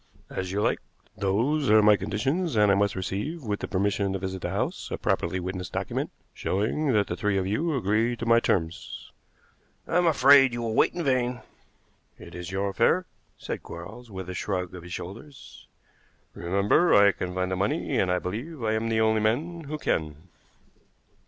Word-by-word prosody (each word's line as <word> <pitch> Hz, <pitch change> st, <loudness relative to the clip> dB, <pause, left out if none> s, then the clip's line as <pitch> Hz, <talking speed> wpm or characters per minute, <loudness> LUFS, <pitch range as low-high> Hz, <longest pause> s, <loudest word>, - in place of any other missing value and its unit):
"As 95 Hz, -1 st, -4 dB
you 100 Hz, +2 st, 0 dB
like. -, -, +1 dB, 0.4 s
Those 115 Hz, +10 st, +1 dB
are 110 Hz, 0 st, +6 dB
my 105 Hz, 0 st, +7 dB
conditions, 125 Hz, -, -1 dB
and 105 Hz, -2 st, +5 dB
I -, -, +5 dB
must 100 Hz, 0 st, +1 dB
receive 105 Hz, -, -4 dB
with 105 Hz, -3 st, -2 dB
the -, -, -4 dB
permission 100 Hz, 0 st, 0 dB
to -, -, -1 dB
visit 95 Hz, 0 st, -5 dB
the -, -, -3 dB
house -, -, -3 dB
a -, -, -3 dB
properly 90 Hz, +2 st, -1 dB
witnessed 90 Hz, 0 st, -5 dB
document, -, -, -2 dB, 0.2 s
showing 120 Hz, +9 st, -1 dB
that 105 Hz, -2 st, +3 dB
the 85 Hz, -, -4 dB
three 105 Hz, +2 st, 0 dB
of 95 Hz, -, 0 dB
you 150 Hz, -, 0 dB
agree 115 Hz, +2 st, +1 dB
to 120 Hz, -, -5 dB
my 115 Hz, 0 st, +5 dB
terms." 85 Hz, -6 st, -2 dB, 0.8 s
"I 165 Hz, -, +1 dB
am 175 Hz, -, +3 dB
afraid 135 Hz, -4 st, +6 dB
you 120 Hz, 0 st, -3 dB
will 115 Hz, -1 st, -2 dB
wait -, -, +3 dB
in 175 Hz, -, -2 dB
vain." 125 Hz, -3 st, 0 dB, 0.8 s
"It -, -, -12 dB
is 90 Hz, -1 st, -6 dB
your 100 Hz, +1 st, -1 dB
affair," 115 Hz, -, +2 dB, 0.3 s
said -, -, -5 dB
Quarles, 110 Hz, +9 st, -10 dB
with 95 Hz, -3 st, -7 dB
a 90 Hz, -, -5 dB
shrug 90 Hz, -1 st, -3 dB
of 90 Hz, -, -8 dB
his 90 Hz, +1 st, -11 dB
shoulders. 115 Hz, +12 st, -9 dB, 0.7 s
"Remember 100 Hz, -, +2 dB
I 100 Hz, 0 st, +7 dB
can 90 Hz, -1 st, -5 dB
find 95 Hz, 0 st, -1 dB
the -, -, 0 dB
money, 95 Hz, +2 st, 0 dB
and 90 Hz, -, +2 dB
I 90 Hz, -, +2 dB
believe 120 Hz, -, -5 dB
I 110 Hz, -1 st, +1 dB
am 110 Hz, +1 st, -1 dB
the 110 Hz, 0 st, +2 dB
only 110 Hz, 0 st, +3 dB
man 155 Hz, +10 st, -1 dB
who 155 Hz, +2 st, -4 dB
can." 80 Hz, -, -2 dB
105 Hz, 190 wpm, -26 LUFS, 95-125 Hz, 0.8 s, my